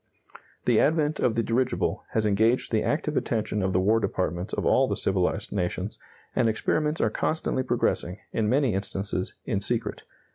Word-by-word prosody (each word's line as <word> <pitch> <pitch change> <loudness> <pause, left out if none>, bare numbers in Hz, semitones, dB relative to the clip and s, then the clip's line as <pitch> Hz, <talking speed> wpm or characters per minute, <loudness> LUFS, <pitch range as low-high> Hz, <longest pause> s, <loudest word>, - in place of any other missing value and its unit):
The 120 -3 +4
advent 155 0 +2
of 115 - +2
the 115 - +1
dirigible 125 +3 0
has 110 -1 +1
engaged 110 +4 +2
the 110 -2 +2
active 150 0 -1
attention 110 -4 -1
of 95 0 0
the 90 - +2
war 105 +4 +3
departments 95 -3 -2
of - - -2
all - - +4
the - - -1
civilized 95 +2 0
nations, 95 +1 -2 0.4
and 120 -3 +3
experiments 150 +8 0
are 110 - +2
constantly 155 -2 -1
progressing, 120 -7 0 0.2
in 110 -2 +1
many 130 -2 +2
instances 95 -1 -3
in - - -1
secret. - - -1
110 Hz, 170 wpm, -26 LUFS, 100-125 Hz, 0.4 s, The